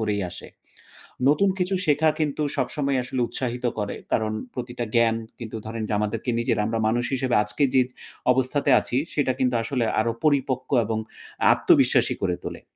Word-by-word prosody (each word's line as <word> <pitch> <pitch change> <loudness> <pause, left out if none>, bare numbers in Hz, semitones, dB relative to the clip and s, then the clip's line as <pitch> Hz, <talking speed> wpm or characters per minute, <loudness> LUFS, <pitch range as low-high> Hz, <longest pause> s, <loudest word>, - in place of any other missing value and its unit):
করেই 105 -2 0
আসে। - - -8 0.8
নতুন 195 +7 +4
কিছু 180 +1 0
শেখা 155 +1 +3
কিন্তু 150 0 0
সবসময় 140 -2 0
আসলে 125 +1 -3
উৎসাহিত 125 -1 -4
করে 105 -1 -2 0.2
কারণ 110 -1 +1 0.2
প্রতিটা 120 -1 -4
জ্ঞান 115 -1 +4 0.2
কিন্তু 115 -2 -6
ধরেন 115 0 -4
যে - - -3
আমাদেরকে 105 +4 -2
নিজেরা 115 -3 +1 0.2
মানুষ 120 +2 +1
হিসেবে 130 -2 0
আজকে 105 +8 -3
যে 130 - +6 0.5
অবস্থাতে 130 +3 +1
আছি 120 - -4 0.2
সেটা 140 -3 +1
কিন্তু 125 -2 +1
আসলে 125 +1 -1 0.2
আরো 115 +1 +1
পরিপক্ক 135 -3 +1
এবং 110 +1 -2 0.5
আত্মবিশ্বাসী - - +3
করে 90 -2 +1
তোলে। - - -6
125 Hz, 155 wpm, -24 LUFS, 115-140 Hz, 0.8 s, যে